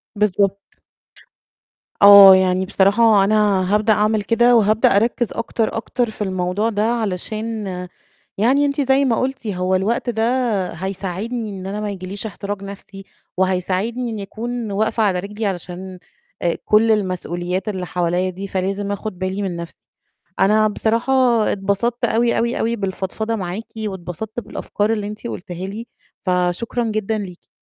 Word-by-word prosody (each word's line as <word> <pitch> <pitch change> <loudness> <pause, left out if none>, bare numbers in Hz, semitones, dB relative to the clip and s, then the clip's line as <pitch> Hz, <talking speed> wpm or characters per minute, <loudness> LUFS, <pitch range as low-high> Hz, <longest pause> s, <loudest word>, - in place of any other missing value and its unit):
بالضبط. 200 -1 +1 1.4
آه، 200 -1 +10
يعني 185 0 +2
بصراحة 205 +2 +4
أنا 205 -2 +2
هابدأ 215 +1 +3
أعمل 215 +1 +1
كده 235 +3 +3
وهابدأ 215 -2 +4
أركّز 235 +2 +2
أكتر، 230 -1 -2
أكتر 240 +1 -1
في 215 - -11
الموضوع 185 +3 -1
ده 210 -2 -1
علشان 220 0 -2 0.7
يعني 265 +7 +3
أنتِ 285 0 0
زي 270 +1 +3
ما 235 -4 +2
قُلتِ 255 -2 -3
هو 185 -1 0
الوقت 225 +6 0
ده 220 -1 -1 0.5
هيساعدني 195 +5 -4
إن 190 -2 -7
أنا 200 +2 -4
ما 210 - -3
ييجي 190 -2 -6
ليش 200 +3 -5
احتراق 205 -1 -5
نَفْسي، 195 0 -10 0.3
وهيساعدني 190 +6 0
إنّي 210 -3 -5
أكون 230 +1 -5
واقفة 220 +2 0
على 190 -4 +1
رجلي 210 +3 -5
علشان 185 0 -5 0.4
آآ 170 - 0
كلّ 220 +1 +4
المسؤوليات 185 -1 -2
اللي 185 -3 -4
حوليّا 180 +1 0
دي 190 +2 -6
فلازم 195 +2 -2
آخُد 205 -2 -5
بالي 190 +2 -2
من 190 -3 -3
نَفْسي. 170 -1 -8 0.6
أنا 215 +2 +4
بصراحة 230 +5 0 0.4
اتبسطت 205 +5 -1
أوي، 235 +1 +1
أوي، 235 +1 0
أوي، 230 +1 0
بالفضفضة 200 +2 -3
معاكِ 195 +2 -5
واتبسطت 205 +1 -5
بالأفكار 210 -1 -2
اللي 205 -2 -3
أنتِ 210 +3 -7
قُلتيها 180 -1 -6
لي، 220 +4 -6 0.4
فشكرًا 180 +6 0
جدًا 215 -1 -1
ليكِ. 185 -4 -8
205 Hz, 145 wpm, -20 LUFS, 190-225 Hz, 1.4 s, آه